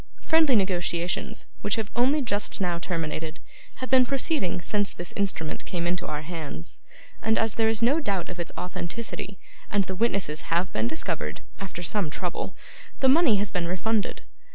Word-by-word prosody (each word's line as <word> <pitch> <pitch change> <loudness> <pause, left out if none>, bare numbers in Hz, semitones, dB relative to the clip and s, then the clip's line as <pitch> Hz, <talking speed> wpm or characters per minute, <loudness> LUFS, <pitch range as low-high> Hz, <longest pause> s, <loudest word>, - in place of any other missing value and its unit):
Friendly 320 -5 +5
negotiations, 180 -3 0 0.2
which 205 - +2
have 220 -2 -2
only 270 +5 +4
just 205 -4 0
now 175 -3 +1
terminated, 160 -2 -3 0.4
have 255 - -6
been 260 -1 +8
proceeding 275 - +1
since 205 +3 +1
this 175 - -6
instrument 190 -6 -1
came 170 -2 -2
into 175 +1 0
our 150 0 -3
hands, 155 - -5 0.4
and, 220 0 +2
as 225 -2 +3
there 225 -1 +3
is 225 0 +1
no 275 +7 +5
doubt 200 - -1
of 180 -1 -7
its 170 - -2
authenticity, 185 +2 -4 0.3
and 205 -1 +3
the 190 - -4
witnesses 195 -7 0
have 170 +3 +1
been 110 +1 +1
discovered 75 -8 -2 0.2
(after 190 -3 -5
some 185 -1 0
trouble), 175 +3 -3 0.4
the 265 - +4
money 285 -5 +6
has 200 0 0
been 175 -3 0
refunded. 205 +4 0
190 Hz, 170 wpm, -27 LUFS, 170-225 Hz, 0.4 s, been